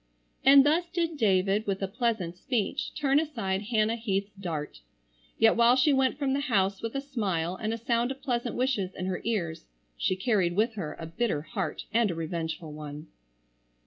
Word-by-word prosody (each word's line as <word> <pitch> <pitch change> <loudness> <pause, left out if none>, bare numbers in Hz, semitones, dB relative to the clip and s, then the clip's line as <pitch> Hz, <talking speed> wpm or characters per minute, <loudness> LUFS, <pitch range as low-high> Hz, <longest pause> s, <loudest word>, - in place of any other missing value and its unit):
And 275 0 +8
thus 335 +4 +2
did 335 -2 -1
David, 200 -3 +2
with 195 0 -1
a - - 0
pleasant 215 -5 -1
speech, 220 +3 -2
turn 280 -1 +3
aside 230 -12 -2
Hannah 220 -1 +2
Heath's 200 -3 -2
dart. 165 - -5 0.6
Yet 225 0 +5
while 235 +1 +5
she 270 +3 +4
went 265 -1 +2
from 275 -2 0
the 275 - +1
house 200 -8 +1
with 230 +3 -4
a 275 - 0
smile 195 - -2
and 215 +3 -3
a 230 - -2
sound 235 +1 0
of 270 0 -5
pleasant 245 -3 -2
wishes 230 -8 0
in 185 - -4
her 185 -1 -2
ears, 175 -8 -2 0.3
she 185 - 0
carried 190 -4 +1
with 220 +3 +2
her 160 -8 -5
a 165 - -5
bitter 165 -2 -1
heart 170 +1 -4
and 230 -2 +3
a 170 - -2
revengeful 160 -1 -4
one. 150 +1 -8
215 Hz, 185 wpm, -28 LUFS, 185-250 Hz, 0.6 s, And